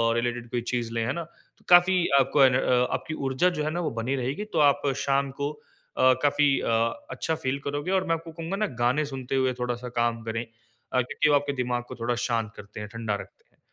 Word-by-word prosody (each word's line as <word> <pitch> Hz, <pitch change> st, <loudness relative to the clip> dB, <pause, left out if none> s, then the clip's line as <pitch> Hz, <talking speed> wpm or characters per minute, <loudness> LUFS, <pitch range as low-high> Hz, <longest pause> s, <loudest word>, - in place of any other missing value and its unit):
Related 120 Hz, 0 st, -2 dB
कोई 120 Hz, -1 st, -1 dB
चीज़ 120 Hz, -2 st, -1 dB
लें, 115 Hz, -1 st, 0 dB
है -, -, -1 dB
ना? 170 Hz, -, -3 dB, 0.4 s
तो -, -, -28 dB
काफ़ी 180 Hz, +1 st, +7 dB, 0.2 s
आपको 135 Hz, +1 st, +4 dB
एनर 125 Hz, -1 st, +4 dB
आपकी 160 Hz, -, -3 dB
ऊर्जा 135 Hz, +8 st, +2 dB
जो -, -, 0 dB
है 155 Hz, -, -1 dB
ना, 175 Hz, -, -2 dB
वो 165 Hz, -, -1 dB
बनी 130 Hz, +4 st, -1 dB
रहेगी। 135 Hz, +11 st, -3 dB
तो 160 Hz, -, +2 dB
आप -, -, -6 dB, 0.2 s
शाम 140 Hz, 0 st, +1 dB
को 145 Hz, +1 st, 0 dB
अ, 140 Hz, -3 st, 0 dB
काफ़ी 145 Hz, -1 st, +3 dB
अ, -, -, -3 dB, 0.4 s
अच्छा 160 Hz, -, -2 dB
फ़ील 140 Hz, -3 st, -2 dB
करोगे 145 Hz, +5 st, -2 dB
और 190 Hz, -, -5 dB
मैं 165 Hz, -, +2 dB
आपको 165 Hz, 0 st, -8 dB
कहूँगा 165 Hz, +3 st, -4 dB
ना 215 Hz, -, +1 dB, 0.2 s
गाने 130 Hz, +5 st, +2 dB
सुनते 130 Hz, 0 st, -3 dB
हुए 130 Hz, -1 st, +2 dB
थोड़ा-सा 125 Hz, 0 st, -3 dB
काम 115 Hz, -1 st, 0 dB
करें। 115 Hz, +1 st, -3 dB, 0.5 s
अ, 125 Hz, -, +4 dB
क्योंकि 145 Hz, +4 st, 0 dB
वो 145 Hz, -, +5 dB
आपके 145 Hz, 0 st, +1 dB
दिमाग 120 Hz, 0 st, -2 dB
को -, -, -6 dB
थोड़ा 120 Hz, +1 st, 0 dB
शांत 115 Hz, -3 st, -1 dB
करते 100 Hz, +1 st, -10 dB
हैं, 105 Hz, -, -5 dB
ठंडा 110 Hz, -2 st, -3 dB
रखते -, -, -16 dB
हैं। -, -, -36 dB
130 Hz, 225 wpm, -26 LUFS, 120-150 Hz, 0.5 s, काफ़ी